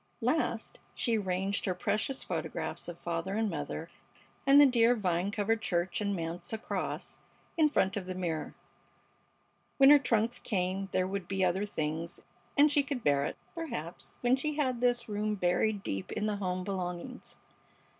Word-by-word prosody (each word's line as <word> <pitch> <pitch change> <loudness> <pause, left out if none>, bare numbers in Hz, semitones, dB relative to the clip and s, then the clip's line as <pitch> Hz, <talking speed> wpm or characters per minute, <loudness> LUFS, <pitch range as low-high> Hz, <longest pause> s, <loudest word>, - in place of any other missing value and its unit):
Last - - -1 0.2
she 230 -3 +1
ranged 190 +1 -1
her 185 - 0
precious 215 +8 -1
photographs - - -3
of 175 -1 -6
father 170 +3 -3
and 220 -2 +1
mother 155 +1 -4 0.6
and 275 +1 +8
the 290 - +10
dear 245 -2 +5
vine 185 -3 0
covered 215 +2 0
church 175 +1 0
and 200 -1 0
manse 170 0 -4
across 220 0 -4 0.4
in 310 -2 +4
front 190 -9 +2
of 190 -3 -4
the 185 - -4
mirror. 170 -4 -3 1.2
When 275 0 +8
her 295 - +9
trunks 235 -2 +1
came 190 -1 -1
there 185 - +2
would 190 -1 -3
be 190 0 +1
other 185 +3 +1
things, 160 -2 -3 0.4
and 295 +1 +6
she 290 -1 +4
could 275 -4 -4
bear 140 -1 +3
it, - - -4 0.2
perhaps, 235 - -6
when 245 +1 +4
she 300 +3 -2
had 260 -5 0
this 245 -1 +2
room 210 0 -1
buried 195 +2 +1
deep 95 -1 -3
in 210 - -1
the 210 -1 0
home 185 -2 -2
belongings. 185 +5 -5
200 Hz, 165 wpm, -31 LUFS, 180-240 Hz, 1.2 s, the